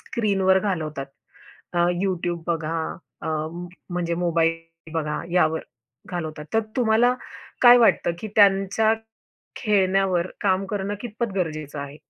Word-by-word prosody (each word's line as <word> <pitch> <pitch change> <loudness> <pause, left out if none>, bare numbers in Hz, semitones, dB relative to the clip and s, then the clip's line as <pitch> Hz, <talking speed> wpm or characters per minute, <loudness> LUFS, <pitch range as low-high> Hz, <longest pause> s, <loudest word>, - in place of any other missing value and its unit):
स्क्रीनवर 195 -4 +2
घालवतात. 155 -8 -3 0.7
अ, 175 0 +3 0.2
YouTube 175 -3 -2
बघा, 165 -1 -1 0.5
अ - - -3 0.6
म्हणजे 175 -1 -1
मोबाईल 165 -1 -1
बघा, 150 -2 -1
यावर 160 -3 +2 0.5
घालवतात. 155 -4 -4
तर 225 - +5 0.2
तुम्हाला 240 0 +4 0.5
काय 245 0 +10
वाटतं, 225 -6 +4
की 215 - -6
त्यांच्या 200 +2 +4 0.6
खेळण्यावर 190 -4 +2 0.2
काम 195 -1 +2
करणं 200 0 -3
कितपत 235 -1 -4
गरजेचं 155 -5 -3
आहे? 140 +1 -7
185 Hz, 115 wpm, -24 LUFS, 165-205 Hz, 0.7 s, काय